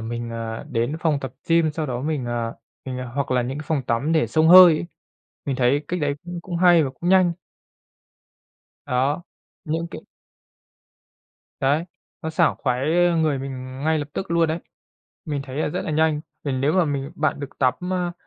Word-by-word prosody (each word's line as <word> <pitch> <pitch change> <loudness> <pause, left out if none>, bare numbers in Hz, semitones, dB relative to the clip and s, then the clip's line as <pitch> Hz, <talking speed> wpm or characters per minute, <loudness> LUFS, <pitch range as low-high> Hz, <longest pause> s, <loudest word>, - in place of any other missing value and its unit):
mình, 115 +1 -5
ờ, 115 -1 -5
đến 120 +6 -1
phòng 155 -4 +1
tập 130 -2 -6
gym, 165 -1 +4
sau 155 -1 -3
đó 125 -2 -3
mình, 150 -3 -2
ờ, 120 -1 -3 0.3
mình 130 -1 -5 0.2
hoặc 140 -1 -2
là 125 -1 +2
những 130 +4 -4
cái 150 - -6
phòng 150 -4 0
tắm 135 +8 0
để 160 - +3
xông 160 0 +3
hơi 180 -1 +10
ấy? 170 - -4 0.6
Mình 135 -2 -2
thấy 135 +3 +2
cách 180 0 -2
đấy 145 -1 0
cũng 175 0 -6
cũng 175 -2 -5
hay 175 -2 +6
và 135 - -3
cũng 175 - -1
nhanh. 185 -2 +5 1.5
Đó, 135 +6 0 0.4
những 165 +1 -2
cái - - -7 1.6
Đấy, 145 +5 +2 0.4
nó 160 - -3
sảng 160 0 +2
khoái 130 +1 -1 0.4
người 150 -3 +1
mình 130 -1 -7
ngay 160 0 +2
lập 145 - -4
tức 190 - -5
luôn 170 -1 +3
đấy, 160 - -1 0.7
mình 145 -4 -3
thấy 135 0 -8
là 155 - 0
rất - - -3
là - - -3
nhanh. 155 0 +2 0.2
Vì 140 - -1
nếu 135 +4 +1
mà 185 -2 +3
mình 140 -1 -3
bạn 155 -5 -1
được 140 -1 -8
tắm, 130 -2 +3 0.2
ơ, 180 -2 -1
145 Hz, 195 wpm, -23 LUFS, 130-160 Hz, 1.6 s, hơi